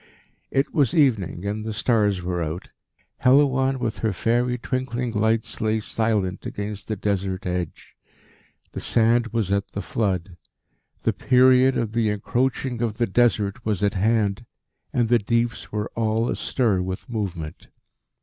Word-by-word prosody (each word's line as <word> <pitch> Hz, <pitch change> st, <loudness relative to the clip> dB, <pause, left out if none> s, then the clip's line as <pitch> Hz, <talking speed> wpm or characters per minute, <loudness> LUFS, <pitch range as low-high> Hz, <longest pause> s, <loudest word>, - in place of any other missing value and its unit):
It 135 Hz, +2 st, 0 dB
was 140 Hz, -7 st, +2 dB
evening 110 Hz, -, +2 dB
and 105 Hz, +1 st, -2 dB
the 110 Hz, 0 st, -4 dB
stars 105 Hz, -3 st, +1 dB
were 90 Hz, -1 st, -2 dB
out. 80 Hz, +3 st, -4 dB, 0.5 s
Helouan, 135 Hz, 0 st, +4 dB
with 115 Hz, -4 st, -3 dB
her 110 Hz, -, 0 dB
fairy 120 Hz, +6 st, +1 dB
twinkling 125 Hz, -1 st, -2 dB
lights, 110 Hz, +1 st, 0 dB
lay 110 Hz, 0 st, +1 dB
silent 105 Hz, -4 st, -1 dB
against 105 Hz, 0 st, -5 dB
the 110 Hz, -, -2 dB
Desert 95 Hz, -2 st, -2 dB
edge. 90 Hz, -2 st, -4 dB, 0.8 s
The -, -, -5 dB
sand 115 Hz, +1 st, +3 dB
was 110 Hz, -4 st, -1 dB
at 100 Hz, 0 st, -1 dB
the 100 Hz, -, -3 dB
flood. 95 Hz, -4 st, -2 dB, 0.7 s
The -, -, +2 dB
period 130 Hz, +1 st, +4 dB
of 110 Hz, -2 st, -1 dB
the 115 Hz, -1 st, +1 dB
Encroaching 120 Hz, +4 st, -1 dB
of 115 Hz, -3 st, -1 dB
the 120 Hz, -, +2 dB
Desert 110 Hz, 0 st, +1 dB
was 105 Hz, -3 st, -1 dB
at 100 Hz, -, +2 dB
hand, 105 Hz, +2 st, +1 dB, 0.4 s
and 120 Hz, -2 st, +1 dB
the 120 Hz, +1 st, +4 dB
deeps 115 Hz, +2 st, -1 dB
were 105 Hz, 0 st, -3 dB
all 115 Hz, +1 st, 0 dB
astir 110 Hz, -8 st, 0 dB
with 95 Hz, 0 st, -5 dB
movement. 90 Hz, -9 st, -5 dB
110 Hz, 150 wpm, -24 LUFS, 100-120 Hz, 0.8 s, Helouan